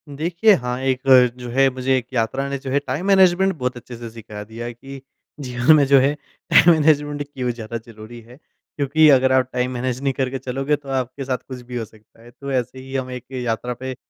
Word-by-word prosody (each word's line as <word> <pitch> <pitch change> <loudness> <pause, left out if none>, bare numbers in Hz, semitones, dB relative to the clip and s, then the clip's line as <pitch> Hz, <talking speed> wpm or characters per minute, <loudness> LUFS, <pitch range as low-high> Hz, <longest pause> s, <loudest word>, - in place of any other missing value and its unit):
देखिये 175 +8 +3
हाँ, 125 0 -4
एक 130 -1 0 0.4
जो 125 -1 -8
है 135 +2 +4
मुझे 130 0 0
एक 120 - -4
यात्रा 130 +4 -1
ने 140 - -2
जो 135 0 -8
है 140 - +2
टाइम 150 +9 -3
मैनेजमेंट 190 -1 +4
बहुत 125 -3 -3
अच्छे 120 +1 -10
से 115 -1 -8
सिखा 110 -2 -9
दिया 115 +3 -8
है 120 - -5
कि 135 +3 -11 0.4
जीवन 125 +2 +3
में 145 -2 +4
जो 140 -1 +6
है 140 +2 +2 0.4
टाइम 170 - +7
मैनेजमेंट 145 -2 +2
क्यों 130 -3 -4
ज़्यादा 115 -1 -6
ज़रूरी 110 +1 -11
है। 120 +3 -16 0.4
क्योंकि 150 +2 +3
अगर 130 -2 +4
आप 130 -1 +2
टाइम 125 0 -1
मैनेज 125 0 -3
नहीं 135 -1 0
करके 130 0 -2
चलोगे 135 +3 -1
तो 140 -1 -12
आपके 130 +1 -3
साथ 130 -1 -1
कुछ 130 -2 -8
भी 125 0 -7
हो 115 - -3
सकता 110 +1 -23
है। 120 - -15
तो 140 +3 -8
ऐसे 130 0 -2
ही 135 +1 -9
हम 130 -1 -2
एक 125 -2 -7
यात्रा 125 -1 -3
पे 130 +1 -6
130 Hz, 225 wpm, -21 LUFS, 120-140 Hz, 0.4 s, टाइम